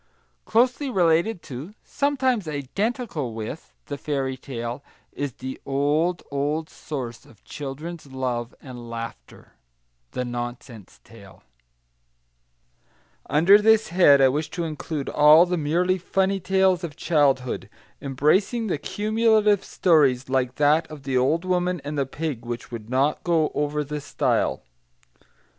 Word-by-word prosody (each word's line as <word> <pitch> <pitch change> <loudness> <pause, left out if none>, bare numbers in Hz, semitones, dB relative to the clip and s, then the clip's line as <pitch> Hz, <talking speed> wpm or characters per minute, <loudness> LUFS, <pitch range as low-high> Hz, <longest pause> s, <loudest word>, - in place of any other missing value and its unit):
Closely 255 +5 +2
related 180 -1 +2
to, 145 - -8
sometimes 260 - 0
identical 155 - -3
with, 110 - -7
the 140 - -6
fairy 135 -3 -2
tale 125 0 -6 0.3
is 145 -3 -4
the 130 +2 -7
old, 150 +6 0
old 150 +3 -2
source 125 -6 -6
of 110 - -21
children's 150 +3 -7
love 125 -3 -3
and 120 -3 -9
laughter, 115 - -8 0.6
THE 125 - -2
NONSENSE 120 -3 -7
TALE - - -16 1.9
Under 180 +7 +6
this 220 0 +4
head 160 -6 +6
I 135 - +7
wish 150 +4 -2
to 170 - -1
include 155 -2 -4
all 150 +3 +7
the 180 0 -1
merely 175 +4 +1
funny 195 +2 0
tales 190 0 +2
of 155 -4 -5
childhood, 140 -7 +1 0.3
embracing 155 - +1
the 175 -8 -2
cumulative 215 0 +2
stories 140 -11 +2
like 130 -1 0
that 150 +2 +3
of 150 -3 -10
the 135 -1 -2
old 150 +8 +2
woman 180 -1 0
and 145 +1 -4
the 140 -2 0
pig 145 -4 -4
which 120 0 -6
would 115 -2 -7
not 135 +4 +1
go 165 -3 +2
over 150 0 -1
the 150 +1 -5
stile. 145 - 0
150 Hz, 130 wpm, -24 LUFS, 130-180 Hz, 1.9 s, I